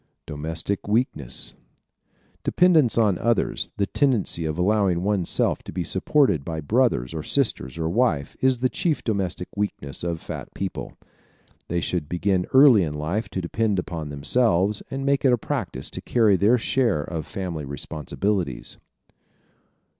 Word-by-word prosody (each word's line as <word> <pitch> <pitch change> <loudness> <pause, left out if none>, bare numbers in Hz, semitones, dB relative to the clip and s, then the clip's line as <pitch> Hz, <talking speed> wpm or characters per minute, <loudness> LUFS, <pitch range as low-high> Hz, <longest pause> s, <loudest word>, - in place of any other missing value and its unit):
Domestic 80 +7 -3
Weakness 105 - -1 0.8
¶ - - -47
Dependence 160 -11 +4
on 105 -6 +3
others, 115 -2 0
the 100 - +2
tendency 115 - +1
of 80 0 -2
allowing 95 -2 +2
one's 100 -3 0
self - - +2
to - - -9
be - - -2
supported 125 - +2
by 80 +1 -4
brothers 80 - +1
or 80 - -3
sisters 80 - 0
or 80 -1 -1
wife, 85 - 0
is 130 -1 +3
the 130 +2 +1
chief 155 +4 -1
domestic 95 -5 -2
weakness 95 -10 -3
of 85 -2 -2
fat - - -7
people. - - -5 0.7
They 85 0 -1
should 80 -5 -2
begin 90 +1 0
early 130 -5 +7
in 75 -4 -2
life 90 +8 -2
to 95 - -3
depend 105 +3 0
upon 80 -4 -4
themselves 100 - +1
and 135 0 -4
make 140 0 +2
it 130 -3 +5
a - - +3
practice 65 - -4
to - - -6
carry 110 -5 +3
their 105 +6 +4
share 115 - +1
of 80 0 -5
family 90 -7 -4
responsibilities. 75 +3 -3
95 Hz, 155 wpm, -24 LUFS, 80-115 Hz, 0.8 s, early